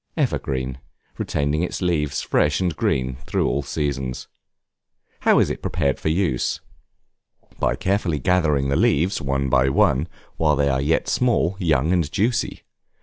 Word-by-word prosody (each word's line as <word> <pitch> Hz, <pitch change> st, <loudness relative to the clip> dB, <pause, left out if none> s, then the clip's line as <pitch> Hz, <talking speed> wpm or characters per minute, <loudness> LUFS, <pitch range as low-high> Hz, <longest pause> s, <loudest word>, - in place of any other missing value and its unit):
Evergreen, 65 Hz, -1 st, -1 dB, 0.4 s
retaining 75 Hz, +2 st, -1 dB
its 90 Hz, -, -2 dB
leaves 80 Hz, -6 st, 0 dB
fresh 75 Hz, -1 st, +1 dB
and 90 Hz, -4 st, -1 dB
green 65 Hz, -3 st, -1 dB
through -, -, 0 dB
all 70 Hz, -, 0 dB
seasons. 70 Hz, -2 st, -3 dB, 0.9 s
How -, -, +4 dB
is -, -, +3 dB
it -, -, -5 dB
prepared 70 Hz, -6 st, -1 dB
for -, -, -1 dB
use? 80 Hz, -7 st, 0 dB, 1.0 s
By -, -, +1 dB
carefully 95 Hz, -1 st, 0 dB
gathering 75 Hz, -3 st, +1 dB
the 70 Hz, -, +1 dB
leaves, 85 Hz, +9 st, +2 dB
one 70 Hz, 0 st, -1 dB
by 65 Hz, 0 st, +3 dB
one, 70 Hz, +3 st, +2 dB, 0.3 s
while 75 Hz, -2 st, +3 dB
they 70 Hz, 0 st, +1 dB
are 65 Hz, -1 st, +1 dB
yet 75 Hz, +4 st, +1 dB
small, 115 Hz, -8 st, +1 dB
young, 80 Hz, -2 st, +2 dB
and 85 Hz, -5 st, 0 dB
juicy. 115 Hz, +4 st, -1 dB
75 Hz, 145 wpm, -22 LUFS, 70-85 Hz, 1.0 s, How